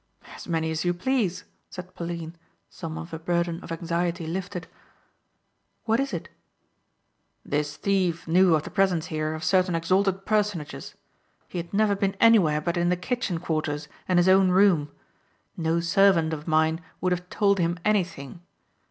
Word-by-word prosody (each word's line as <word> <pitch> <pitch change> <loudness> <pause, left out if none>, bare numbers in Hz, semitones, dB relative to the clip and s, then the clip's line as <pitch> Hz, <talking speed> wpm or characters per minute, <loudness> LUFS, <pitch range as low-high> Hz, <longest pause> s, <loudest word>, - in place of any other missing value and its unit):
"As - - -10
many 160 -2 -1
as 160 0 -2
you 175 0 0
please," 185 -3 -1 0.3
said 180 0 -9
Pauline, 170 -1 -6 0.4
some 160 -1 -7
of 165 - -8
her 160 - -5
burden 170 0 -1
of - - -9
anxiety 170 +1 -2
lifted. 180 +1 -4 1.2
"What 225 +1 +1
is 275 0 -1
it?" - - -5 1.2
"This 145 0 -2
thief 185 -5 0
knew 175 +1 +5
of 155 - -1
the - - -8
presence 190 -5 +1
here 155 0 -1
of 155 - -7
certain 185 0 +2
exalted 190 +3 +1
personages. 205 -8 -2 0.5
He 180 - -5
had 170 0 -7
never 205 0 +2
been 195 0 -1
anywhere 185 -10 +5
but 170 +3 -2
in 175 0 +2
the 180 - +1
kitchen 195 -1 -2
quarters 155 -3 -2 0.2
and 185 - +2
his 175 +1 +4
own 190 0 +5
room. 180 -6 +4 0.7
No 165 0 0
servant 170 -2 +3
of 150 +1 -6
mine 160 +1 +2 0.2
would 185 - 0
have 180 0 -2
told 200 -2 +2
him 170 0 0
anything. 175 -7 -1
175 Hz, 160 wpm, -25 LUFS, 160-190 Hz, 1.2 s, knew